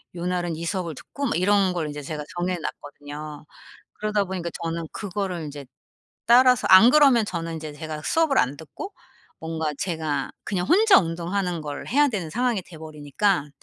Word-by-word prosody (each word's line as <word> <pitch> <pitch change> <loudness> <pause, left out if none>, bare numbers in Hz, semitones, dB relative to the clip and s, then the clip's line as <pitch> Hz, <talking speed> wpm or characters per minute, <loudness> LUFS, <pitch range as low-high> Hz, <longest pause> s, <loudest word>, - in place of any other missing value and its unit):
요날은 175 -1 -2
이 170 - -5
수업을 170 -4 -3
듣고 280 - -6
막 225 - 0
이런 195 0 +3
걸 160 -4 -2
이제 145 0 -6
제가 150 +1 -5
정해 180 +1 -1
놨거든요. 145 0 -8 0.5
그러다 210 -1 -1
보니까 180 -2 -4
저는 165 0 -3
그거를 190 -4 -4
인제 145 -1 -8 0.6
따라서 250 +1 +5
안 190 +6 +9
그러면 275 -6 +6
저는 165 -4 -4
인제 155 -1 -7
제가 155 0 -6
수업을 320 -5 +2
안 135 +3 +1
듣고 275 - -9 0.5
뭔가 160 -1 -3
제가 160 -5 -2
그냥 180 -3 -2
혼자 420 +2 +6
운동하는 175 +1 -2
걸 145 -1 -6
해야 290 +3 +3
되는 190 -9 -3
상황이 240 +2 0
돼 170 - -13
버리니까. 155 +2 -1
175 Hz, 350 characters per minute, -24 LUFS, 155-205 Hz, 0.6 s, 안